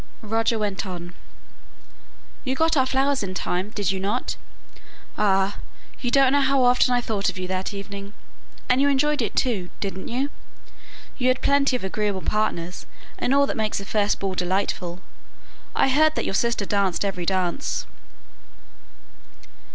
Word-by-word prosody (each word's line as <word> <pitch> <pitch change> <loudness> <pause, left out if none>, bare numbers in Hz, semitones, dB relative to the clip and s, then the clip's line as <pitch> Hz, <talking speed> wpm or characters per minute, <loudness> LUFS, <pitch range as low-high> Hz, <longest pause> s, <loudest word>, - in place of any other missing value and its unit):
Roger 225 +1 +1
went 205 -3 -1
on, 175 -3 -7 1.3
"You 260 -1 -1
got 320 +2 +2
our 260 -2 +3
flowers 270 +1 +2
in 185 -2 -4
time, 185 +2 -1
did 205 -2 -1
you 190 - -2
not? 205 +6 -1 0.8
Ah! 195 -1 +2 0.4
you 245 - -1
don't 270 +1 +5
know 285 - +4
how 275 -1 +3
often 245 0 +4
I 245 0 +3
thought 210 -4 0
of - - -6
you 185 0 -3
that 185 0 -2
evening! 200 0 -7 0.5
And 250 +1 +3
you 285 - +4
enjoyed 290 +1 +2
it 225 - -2
too, 205 -9 0
didn't 195 -2 -4
you? 265 +4 -1 0.9
you 250 - +2
had 255 0 +2
plenty 280 -2 +3
of 250 - -3
agreeable 200 0 -1
partners, 180 -5 -1 0.3
and - - 0
all 280 +1 +5
that - - -3
makes 215 -2 -1
a 195 - -7
first 205 0 +1
ball 195 -1 -2
delightful? 180 -1 -1 0.7
I - - +4
heard 310 +3 +4
that - - -1
your - - -2
sister 235 0 +1
danced 200 -2 +1
every 180 -3 -3
dance." 185 +7 0
210 Hz, 160 wpm, -24 LUFS, 190-255 Hz, 1.3 s, don't